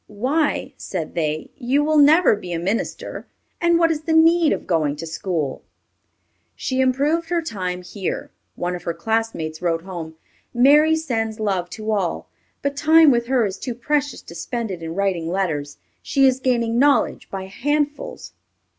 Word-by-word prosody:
"Why," 260 +10 -1
said 170 -5 -5
they, 155 -1 -2
"you 270 +3 +1
will 305 0 +3
never 305 -1 +6
be 180 -4 -7
a - - -1
minister, 195 +6 -3 0.3
and 340 -1 +4
what 330 -1 +3
is 305 -2 -2
the 320 +1 -1
need 325 0 +5
of - - -2
going 155 -5 +1
to 160 +3 -7
school?" 160 -3 -3 0.9
She 260 0 -1
improved 290 +6 +1
her 350 -1 +1
time 180 - -4
here. 190 +1 -5 0.2
One 180 0 -2
of 175 - -7
her 170 -1 -3
classmates 175 -5 -2
wrote 165 -2 0
home, 170 -4 -7 0.4
"Mary 295 +6 +6
sends 225 -8 -2
love 190 -5 -1
to 220 0 -3
all; 195 -5 -2 0.3
but 280 0 -1
time 315 +1 +6
with 235 -1 +1
her 255 -3 +2
is 195 -1 -4
too 245 -3 -4
precious 290 +3 -1
to - - -11
spend 230 +5 -4
it 180 -3 -6
in 165 0 -5
writing 185 -4 -1
letters. 160 -6 -2 0.2
She 275 -1 +2
is 260 -1 +3
gaining 235 -3 +1
knowledge 285 +1 +2
by 195 -1 -5
handfuls." 290 - -2
225 Hz, 170 wpm, -21 LUFS, 180-290 Hz, 0.9 s, never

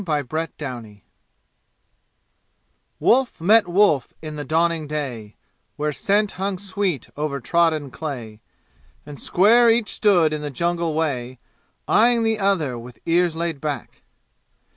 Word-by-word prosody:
Chapter 160 -5 -1 0.4
XVI 120 -8 -8 2.0
Wolf 255 0 +2
met 205 +4 +4
wolf 175 - +2
in 155 -1 -7
the 145 - -5
dawning 160 +1 0
day 130 -8 -5 0.4
Where 150 +1 -1
scent 205 +6 +1
hung 195 0 -3
sweet 190 - -3
over 145 -1 -3
trodden 155 -1 +1
clay, 120 -9 -7 0.6
And 145 -1 -10
square 230 +6 +5
each 225 -1 +2
stood 175 -7 +3
in 150 - -3
the 150 - -4
jungle 170 +2 -1
way 130 -6 -2 0.5
Eyeing 235 +1 +4
the 225 -1 0
other 165 -11 0
with 120 +1 -12
ears 170 0 +2
laid 165 -4 -3
back. 145 -6 -5
160 Hz, 125 wpm, -22 LUFS, 140-195 Hz, 2.0 s, square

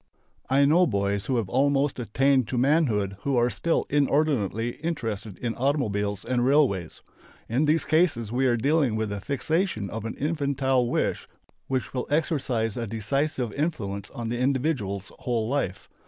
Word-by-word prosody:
I 140 +1 +4
know 170 +5 +5
boys 100 -3 -1
who 130 - +1
have 110 -4 -1
almost 140 +4 +1
attained 130 +2 +2
to 125 - -3
manhood 120 - +2
who 140 -2 0
are 120 +1 +3
still 170 - 0
inordinately 135 -6 +1
interested 115 - -4
in 120 -2 -2
automobiles 105 -8 -1
and 125 -1 0
railways. 125 - +2 0.5
In 130 +7 +1
these 155 +2 +2
cases 155 - +2
we 130 +2 +2
are 120 -1 +2
dealing 140 -1 +2
with 110 -1 -2
a 100 -1 -4
fixation 140 - -1
of 110 0 -5
an 115 - -4
infantile 140 -4 0
wish - - -1 0.4
which 130 -2 -2
will 125 - -3
exercise 135 -8 0
a 115 -1 -3
decisive 125 +2 -1
influence 100 - -3
on 115 -1 -5
the 120 +1 -2
individual's 125 - -1
whole 115 -3 -1
life. 120 -9 -2
125 Hz, 155 wpm, -26 LUFS, 110-145 Hz, 0.5 s, know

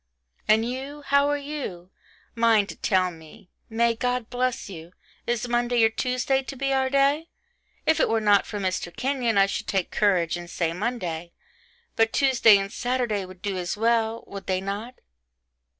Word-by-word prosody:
And 220 +2 +4
you? 270 +4 -6
how 280 +1 +3
are 290 - +1
you? 280 -12 -6 0.4
Mind 225 -3 +3
to - - -7
tell 185 -2 +1
me. 160 +2 -15 0.2
May 230 +1 +2
God 245 0 -2
bless 250 0 -1
you. 170 -2 -10 0.3
Is 240 0 -1
Monday 240 0 +2
or 225 - +6
Tuesday 255 +3 0
to 270 - -8
be 275 +1 -1
our 265 0 +1
day? 280 +4 +2 0.6
If 320 - +3
it - - +3
were 225 - +2
not 205 -2 +3
for 210 - -5
Mr. 185 -3 -2
Kenyon 250 -4 0
I 195 - +6
should 195 - -4
take 190 -3 -1
courage 180 -5 +2
and 175 0 -9
say 165 -2 -1
Monday 175 -5 -4 0.6
but 225 0 +2
Tuesday 245 -6 +5
and 195 +1 -4
Saturday 245 -5 -1
would 185 0 -14
do 200 -2 -2
as 175 +3 -3
well 225 0 +1
would 200 -1 -9
they 185 -1 +1
not? 205 +6 -5
225 Hz, 175 wpm, -25 LUFS, 195-255 Hz, 0.6 s, or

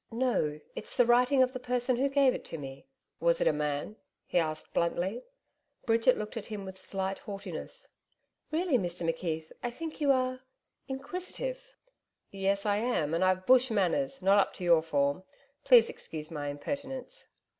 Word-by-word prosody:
'No, 230 -11 0 0.2
it's - - -6
the 245 - +6
writing 250 +3 +5
of 255 0 -1
the 255 - -4
person 250 0 0
who 275 +2 +2
gave 275 -2 +4
it - - -5
to 165 - -6
me.' 135 - -9 0.3
'Was - - +3
it - - +1
a - - +4
man?' 150 +8 -2 0.3
he 180 - +1
asked 155 -2 -3
bluntly. 185 +7 0 0.6
Bridget 230 +1 +4
looked 215 +2 -5
at 215 - -5
him 205 -3 -6
with 190 0 -9
slight 195 0 -3
haughtiness. 200 - -7 0.6
'Really, 315 -5 +2
Mr 175 -2 -3
McKeith, 160 -1 -2
I 240 - -1
think 315 +5 -7
you 285 -2 +4
are 255 -1 +1 0.5
inquisitive.' 370 - -5 0.6
'Yes, 195 +1 0
I 205 -1 +2
am. 210 -10 0
And 170 +2 +2
I've 185 0 +2
Bush 255 0 +6
manners 230 +6 0
not 195 +2 +5
up 195 - +1
to - - -7
your 170 -2 +5
form. 145 -1 0 0.4
Please 245 -4 +7
excuse 155 0 -7
my 145 -2 -4
impertinence.' 270 - -5
220 Hz, 170 wpm, -30 LUFS, 175-260 Hz, 0.6 s, Please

